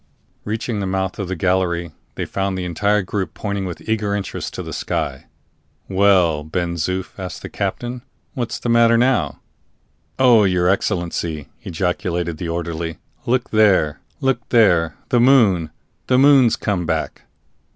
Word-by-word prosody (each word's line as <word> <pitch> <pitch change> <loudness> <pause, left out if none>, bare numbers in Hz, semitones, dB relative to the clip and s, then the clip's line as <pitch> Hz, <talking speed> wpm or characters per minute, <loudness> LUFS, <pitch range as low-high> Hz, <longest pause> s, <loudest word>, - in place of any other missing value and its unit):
Reaching 110 +1 -3
the 100 - -2
mouth 95 0 -2
of 100 - -3
the 95 - -3
gallery, 85 -1 0 0.2
they - - -3
found 95 -1 -2
the 90 - -3
entire 100 +4 +1
group 95 +1 -4
pointing 100 -2 -3
with 90 -2 -7
eager 105 -2 0
interest 100 -2 -4
to - - -4
the - - -7
sky. - - -3 0.6
"Well, 95 -6 +3
Ben 85 +2 -2
Zoof," 90 +3 -2
asked 95 -1 -6
the - - -6
captain, 120 0 -3 0.3
"what's 120 -2 -3
the - - -5
matter 115 0 +5
now?" 125 +1 +1 0.8
"Oh, 125 -5 +6
your 90 -2 +2
Excellency," 85 -6 -1
ejaculated 85 -1 -2
the 85 - -4
orderly, 85 -1 -3 0.3
"look 125 +1 0
there! 100 -9 +3 0.2
look 135 -2 +1
there! 85 - +3
The 120 - +3
moon! 110 - +4 0.4
the 125 - +3
moon's 135 -3 +6
come 95 -6 -2
back!" - - -2
95 Hz, 150 wpm, -20 LUFS, 85-110 Hz, 0.8 s, Oh